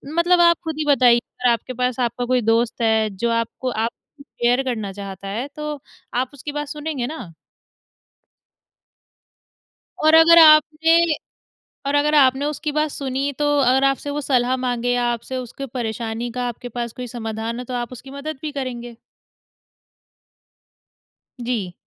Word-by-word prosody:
मतलब 350 +1 +3
आप 340 -1 +5
खुद 320 -2 -4
ही 305 - -1
बताइए 245 -2 +5
अगर 245 +1 -2
आपके 235 +2 -2
पास 250 0 -1
आपका 245 0 -1
कोई 250 0 +1
दोस्त 225 +1 +1
है, 220 -1 +2
जो 205 +4 -2
आपको 230 +2 -2
आप 225 0 -1 0.3
कुछ 280 - -15
शेयर 245 0 0
करना 220 -6 -3
चाहता 195 -1 -8
है, 225 +8 -3
तो 300 -1 -5 0.3
आप 250 +1 0
उसकी 285 +1 -7
बात 295 0 -4
सुनेंगे 295 -4 -4
ना? 240 - -8 2.7
और 315 - +6
अगर 330 +1 +8
आपने 320 +1 +6 0.8
और 280 +1 0
अगर 300 +1 +2
आपने 270 0 +4
उसकी 300 0 -3
बात 305 +1 0
सुनी 275 +1 -2
तो 295 - +1
अगर 265 +1 +3
आपसे 275 +1 +1
वो 295 +1 -2
सलाह 255 -2 +1
माँगे 245 -1 -2
या 245 0 +1
आपसे 235 +2 -5
उसकी 255 +2 -6
परेशानी 230 0 -3
का, 250 0 -3
आपके 245 +1 -6
पास 235 -1 -5
कोई 250 -1 -7
समाधान 225 0 -5
है 250 - -6
तो 250 - -7
आप 240 -1 -3
उसकी 260 +2 -11
मदद 280 +1 -6
भी 310 - -4
करेंगे। 245 -4 -5 2.5
जी। 215 -8 -2
250 Hz, 160 wpm, -21 LUFS, 235-290 Hz, 2.7 s, अगर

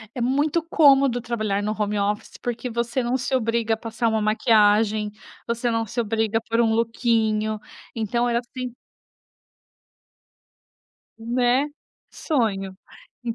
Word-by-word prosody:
é 245 - -3
muito 290 +6 +1
cômodo 275 -6 +4
trabalhar 215 -4 -1
no 210 +1 -1
home 210 0 0
office, 205 +1 -2
porque 245 +1 -3
você 235 +2 -1
não 245 +2 0
se 265 +1 -1
obriga 230 -2 +1
a - - -1
passar 225 +1 -2
uma 220 -1 +1
maquiagem, 215 -2 +3 0.4
você 235 +1 -1
não 225 0 0
se 235 +3 -5
obriga 225 0 0
a - - -1
pôr 230 +1 0
um 225 -1 +2
lookinho, 220 -2 +1 0.4
então 235 +2 0
é 235 - +1
assim 250 0 -5 2.5
Né, 245 +4 +1 0.4
sonho. 200 - -1 0.5
En 230 -1 -2
230 Hz, 135 wpm, -23 LUFS, 215-245 Hz, 2.5 s, cômodo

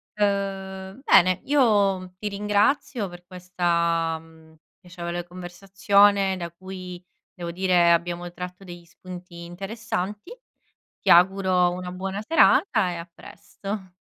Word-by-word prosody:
Uhm, 195 +1 -2
bene, 185 -7 +5
io 200 -9 +2
ti 210 +1 -4
ringrazio, 210 +3 0
per 175 0 -13
questa, 170 -2 -1
mhmm, 160 -1 -19 0.2
piacevole 175 -1 -6
conversazione 195 +2 +2
da 170 -1 -5
cui, 180 0 -9 0.3
devo 170 -2 -6
dire, 180 -1 +3
abbiamo 175 +1 -1
tratto 180 +2 -8
degli 175 -2 -11
spunti 180 0 -11
interessanti. 200 - -5 0.7
Ti - - -4
auguro 180 0 +4
una 180 0 -6
buona 190 +2 -4
serata, 220 - +3
e - - -5
a 170 +1 -9
presto. 195 -1 -8
185 Hz, 115 wpm, -24 LUFS, 175-200 Hz, 0.7 s, bene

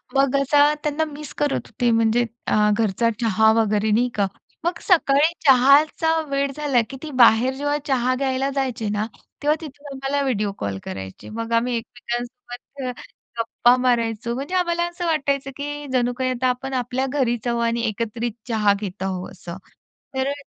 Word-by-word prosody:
मग 275 0 +3
असा 290 +2 +4
त्यांना 300 +1 0
मिस 290 0 -9
करत 290 -2 -1
होते 245 -2 0
म्हणजे 225 +1 +3 0.2
अ, 210 0 +3
घरचा 225 +1 +1
चहा 220 -1 +4
वगैरे, 215 0 +1
नाही 240 +4 +3
का? 200 -2 +2 0.4
मग 345 - -1
सकाळी 315 -4 +3
चहाचा 290 +5 +5
वेळ 275 0 0
झाला, 285 -5 +2
की 270 - -7
ती 310 - -6
बाहेर 235 +3 +6
जेव्हा 290 +2 -1
चहा 255 -2 +1
घ्यायला 265 0 0
जायचे 255 -5 -1
ना, 210 +1 -1 0.4
तेव्हा 300 +1 +3
तिथून 290 -1 -11
आम्हाला 270 +1 -1
व्हिडिओ 210 -6 0
कॉल 100 -1 -3
करायचे. 95 0 -8
मग 230 +1 -5
आम्ही 240 +1 +2
एकमेकांसोबत 245 +3 -7
अ, - - -1 0.5
गप्पा 240 +2 +3
मारायचो. 235 -2 0
म्हणजे 280 +8 -4
आम्हाला 345 -1 +1
असं 345 0 -5
वाटायचं, 280 -4 0
की 290 0 -5
जणू 245 -1 +2
काही 260 -1 0
आता 255 +1 0
आपण 265 +2 -3
आपल्या 250 +1 -1
घरीच 250 -4 -1
आहोत 235 0 0
आणि 235 0 0
एकत्रित 230 +2 -3 0.2
चहा 215 -4 +3
घेत 190 -2 -5
आहोत 185 -1 -3
असं. 175 -1 -9 0.6
तर 265 +1 0
अ, - - -1
250 Hz, 170 wpm, -22 LUFS, 230-280 Hz, 0.6 s, बाहेर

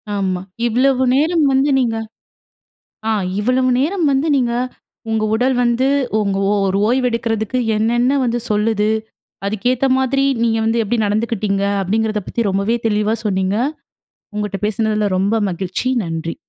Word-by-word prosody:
ஆமா. 190 -2 -1 0.3
இவ்வளவு 260 +3 +2
நேரம் 315 +2 +2
வந்து, 270 +2 +2
நீங்க 230 -3 0 1.1
ஆ, - - +3 0.3
இவ்வளவு 255 +3 +2
நேரம் 335 +6 0
வந்து 270 +3 +1
நீங்க, 245 -4 +1 0.6
உங்க 220 -1 0
உடல் 250 +4 +2
வந்து, 240 +2 +2 0.3
உங்க 200 -2 0
ஒ - - +2
ஒரு 195 +1 0
ஓய்வெடுக்கிறதுக்கு 235 -2 0 0.2
என்னென்ன, 240 +5 +2
வந்து 240 0 0
சொல்லுது. 210 0 +1 0.6
அதுக்கேத்த 245 +6 0
மாதிரி, 270 +1 +1 0.2
நீங்க 225 -1 +2
வந்து 225 +1 +2
எப்படி 230 +3 -1
நடந்துக்கிட்டிங்க. 205 -2 -1 0.2
அப்படிங்கிறத 215 +2 -1
பத்தி, 235 - -1
ரொம்பவே 200 +4 0
தெளிவா 210 +1 +1
சொன்னீங்க. 190 0 0 0.8
உங்கட்ட 205 -2 -3
பேசுனதில, 215 -1 0
ரொம்ப 205 +4 +1
மகிழ்ச்சி. 185 +7 -3 0.2
நன்றி. 165 +2 -4
225 Hz, 130 wpm, -18 LUFS, 205-255 Hz, 1.1 s, ஆ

